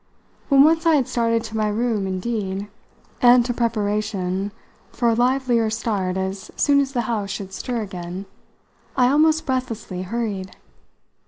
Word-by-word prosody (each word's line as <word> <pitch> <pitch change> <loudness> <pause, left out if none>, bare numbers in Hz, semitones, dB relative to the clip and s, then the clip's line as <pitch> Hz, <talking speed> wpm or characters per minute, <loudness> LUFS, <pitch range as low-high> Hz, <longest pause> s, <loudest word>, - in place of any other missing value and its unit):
When 275 -1 +7
once 325 +2 +3
I 325 - +6
had 270 -4 +2
started 230 -1 +1
to 220 -1 -7
my 215 -1 +1
room 215 -2 0
indeed 195 0 -3 0.5
and 245 -1 +6
to 245 - -1
preparation 205 -4 -1 0.4
for 235 -1 +1
a - - +3
livelier 245 -1 +2
start 205 -4 -1
as 190 0 -4
soon 285 -1 +3
as 275 -1 -1
the 245 - +1
house 215 -4 -2
should 195 -1 -6
stir 240 +2 -3
again 180 -1 -6 0.7
I 250 -1 +5
almost 315 +2 +3
breathlessly 230 -8 -3
hurried. 195 -2 -4
225 Hz, 150 wpm, -22 LUFS, 195-245 Hz, 0.7 s, When